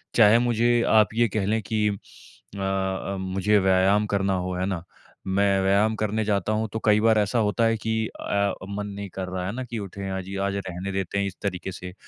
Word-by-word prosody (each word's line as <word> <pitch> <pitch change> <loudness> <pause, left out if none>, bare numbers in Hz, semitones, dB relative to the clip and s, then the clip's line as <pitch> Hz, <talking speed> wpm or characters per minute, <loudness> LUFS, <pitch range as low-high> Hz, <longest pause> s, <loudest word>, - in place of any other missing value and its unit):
चाहे 115 0 +6
मुझे 120 0 +2
आप 110 -2 +4
ये 120 +1 +3
कह 100 - 0
लें 110 +3 +1
कि 105 0 0
अ 100 0 -11
अ, 95 0 -2
मुझे 95 +3 +1
व्यायाम 95 +2 +3
करना 100 -1 0
हो, 90 0 -2
है 90 +1 -1
ना? 95 -3 -3 0.4
मैं 100 0 +2
व्यायाम 100 +3 +3
करने 110 0 -1
जाता 100 -1 0
हूँ 110 +1 0
तो 110 - -2
कई 105 -1 +5
बार 110 0 +4
ऐसा 105 +3 +1
होता 110 +1 +1
है 115 0 +2
कि 110 +1 -3 0.2
अ, 100 -1 -1 0.2
मन 100 0 -4
नहीं 100 -1 -6
कर 95 -1 -4
रहा 90 0 -3
है - - -2
ना, 130 - -3
कि 120 -2 -6
उठे 100 -1 -6
आज 95 -1 -6
या 100 0 -2
आज 100 0 -1
रहने 90 +2 -5
देते 95 0 -2
हैं 100 - +1
इस 95 - -7
तरीके 95 -1 -3
से। 90 0 -8
100 Hz, 225 wpm, -25 LUFS, 95-110 Hz, 0.4 s, चाहे